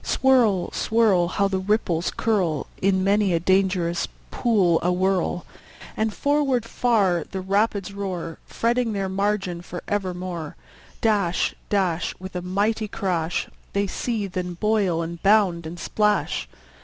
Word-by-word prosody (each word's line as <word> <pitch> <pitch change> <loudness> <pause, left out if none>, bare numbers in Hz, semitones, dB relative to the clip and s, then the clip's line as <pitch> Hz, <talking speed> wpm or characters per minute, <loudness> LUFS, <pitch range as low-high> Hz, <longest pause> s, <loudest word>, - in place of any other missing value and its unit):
Swirl, 235 -9 +3
swirl! 215 -6 +2
How 200 +3 +1
the 190 -1 -1
ripples 185 -4 0
curl 185 -10 +1 0.2
In 190 -1 +2
many 200 -1 +3
a 165 - +2
dangerous 185 -1 +1 0.2
pool 195 -9 +3
awhirl! 180 0 0 0.5
And 220 0 0
forward 280 -2 +1
far 205 -8 +2
the 190 - -4
rapids 200 +1 0
roar, 185 -5 -4
Fretting 235 0 0
their 195 -1 -2
margin 190 -2 -1
for 175 0 -8
evermore. 180 -5 -3 0.5
Dash, 200 -6 +1 0.2
dash, 180 -5 0
With 185 0 -9
a 180 - -2
mighty 205 +4 0
crash, 180 -5 -1 0.3
They 200 0 +1
seethe, 205 -1 -3
and 180 -1 -3
boil, 200 -6 +1
and 170 0 -6
bound, 195 -5 +3
and 170 +2 -8
splash. 210 +3 0
190 Hz, 130 wpm, -24 LUFS, 175-210 Hz, 0.5 s, Swirl